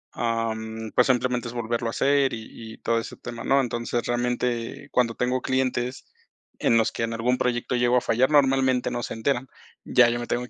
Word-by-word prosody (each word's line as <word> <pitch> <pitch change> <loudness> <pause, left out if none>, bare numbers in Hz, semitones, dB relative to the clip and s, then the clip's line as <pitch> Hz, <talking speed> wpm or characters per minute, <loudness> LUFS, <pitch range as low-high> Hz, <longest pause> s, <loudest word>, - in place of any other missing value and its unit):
em, 110 -1 -2
pues, 125 - +3
simplemente 125 -1 +1
es 120 - -7
volverlo 120 0 -2
a - - -1
hacer, 140 0 +2
y 110 0 -8
y - - -13
todo 115 0 +1
ese - - -7
tema, 120 - -8
¿no?, 135 0 +4
entonces, 120 -1 -2
realmente, 120 -1 -2
cuando 115 -2 +1
tengo 125 +1 0
clientes 130 -1 -1 0.5
en 115 - +3
los 115 -1 +2
que 115 - -3
en 115 - -2
algún 120 +3 +1
proyecto 125 0 -1
llego 120 0 +3
a - - +2
fallar, 125 +3 +2
normalmente 135 -3 +3
no 120 - -2
se - - -4
enteran, 130 +3 -1 0.4
ya 125 -2 +5
yo 120 0 -1
me 120 - -5
tengo 120 +1 -1
que - - -25
120 Hz, 205 wpm, -25 LUFS, 115-125 Hz, 0.5 s, ya